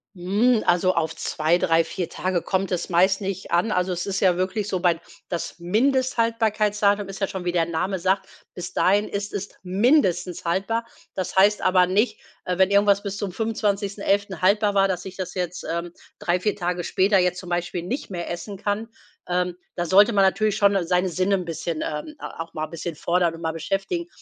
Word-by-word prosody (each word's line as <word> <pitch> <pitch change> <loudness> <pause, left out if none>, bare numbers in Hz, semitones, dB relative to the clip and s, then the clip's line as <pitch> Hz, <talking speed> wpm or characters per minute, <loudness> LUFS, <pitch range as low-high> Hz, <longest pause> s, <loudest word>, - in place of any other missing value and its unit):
Hm, 210 +6 +2
also 180 +1 +3
auf 160 -1 -1
2, 160 +3 +1
3, 165 -1 +2
4 180 0 -4
Tage 185 -2 -1
kommt 195 0 -1
es 175 - -2
meist 190 +3 +3
nicht 195 -1 -4
an. 175 +6 +2
Also, 180 -1 0
es 175 - -3
ist 195 -1 -2
ja 185 -2 +4
wirklich 190 +3 -1
so 185 -3 -2
weil 170 -2 +3 0.3
das 175 - -4
Mindesthaltbarkeitsdatum 215 -2 +1
ist 195 +1 -8
ja 195 - +2
schon, 190 -2 -6
wie 175 - 0
der 170 -2 +2
Name 175 +4 -1
sagt, 190 +2 0 0.3
bis 180 0 -7
dahin 205 +3 +3
ist 200 0 -4
es 200 0 -4 0.2
mindestens 185 - +2
haltbar. 195 +7 -1 0.3
Das 185 -1 -3
heißt 205 +2 +5
aber 185 -1 +4
nicht, 205 +6 +1 0.2
äh, 180 -1 -2
wenn 190 +1 +4
irgendwas 200 0 +4
bis 200 -1 -4
zum 200 -1 -3
25.11. 200 -2 -1
haltbar 205 +2 +3
war, 195 -1 +3
dass 180 -1 -3
ich 190 0 -8
das 185 -2 -5
jetzt, 180 -1 -3
ähm, 170 +1 -3 0.3
3, 175 +1 0
4 210 +2 0
Tage 180 -1 -2
später 195 +4 +2
jetzt 180 -1 +1
zum 180 - -9
Beispiel 175 0 -2
nicht 240 +11 -4
mehr 175 -3 -5
essen 195 +4 -5
kann. 210 +3 -2 0.4
Ähm, 180 0 0 0.2
da 175 - -1
sollte 200 +6 +6
man 200 -3 +4
natürlich 215 +2 +1
schon 200 -1 +4
seine 180 +1 +2
Sinne 185 +3 +1
'n 185 -2 -3
bisschen, 165 -1 -4
ähm, 155 - -5
äh, - - -14 0.2
auch 165 0 -6
mal 155 0 -2
'n - - -15
bisschen 170 0 -5
fordern 170 +1 +1
und 165 - -11
mal 160 -1 -2
beschäftigen. 195 - -2
190 Hz, 205 wpm, -24 LUFS, 175-205 Hz, 0.4 s, sollte